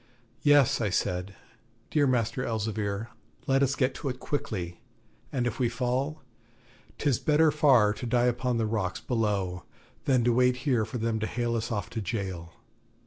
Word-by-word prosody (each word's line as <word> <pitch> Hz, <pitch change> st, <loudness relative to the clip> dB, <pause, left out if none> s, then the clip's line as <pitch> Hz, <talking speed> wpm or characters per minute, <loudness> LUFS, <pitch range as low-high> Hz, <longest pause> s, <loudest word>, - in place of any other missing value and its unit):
'Yes,' 145 Hz, -5 st, +4 dB
I 105 Hz, -, +1 dB
said, 90 Hz, +1 st, -1 dB, 0.6 s
'dear 145 Hz, -2 st, +3 dB
Master 125 Hz, 0 st, 0 dB
Elzevir, 110 Hz, -2 st, -2 dB, 0.4 s
let 135 Hz, 0 st, +2 dB
us 140 Hz, 0 st, +2 dB
get 130 Hz, -1 st, +1 dB
to 140 Hz, -, -4 dB
it 125 Hz, 0 st, -5 dB
quickly; 90 Hz, -, -3 dB, 0.5 s
and 125 Hz, -3 st, -1 dB
if 120 Hz, -, -2 dB
we 125 Hz, -2 st, +2 dB
fall, 130 Hz, +5 st, -2 dB, 0.7 s
'tis 140 Hz, -6 st, +1 dB
better 155 Hz, +1 st, +4 dB
far 130 Hz, -8 st, +4 dB
to 120 Hz, -, -6 dB
die 120 Hz, +1 st, +2 dB
upon 125 Hz, 0 st, 0 dB
the 115 Hz, -, +1 dB
rocks 105 Hz, -4 st, -2 dB
below 100 Hz, -7 st, -1 dB, 0.4 s
than 130 Hz, -3 st, +3 dB
to 120 Hz, 0 st, +3 dB
wait 125 Hz, +1 st, +4 dB
here 120 Hz, -6 st, +2 dB
for 110 Hz, +3 st, -5 dB
them 115 Hz, -1 st, -1 dB
to 110 Hz, -, -1 dB
hale 120 Hz, -1 st, -1 dB
us 110 Hz, +1 st, -2 dB
off 105 Hz, -2 st, -3 dB
to 115 Hz, -, -3 dB
jail.' 95 Hz, -6 st, -4 dB
120 Hz, 170 wpm, -28 LUFS, 105-130 Hz, 0.7 s, Yes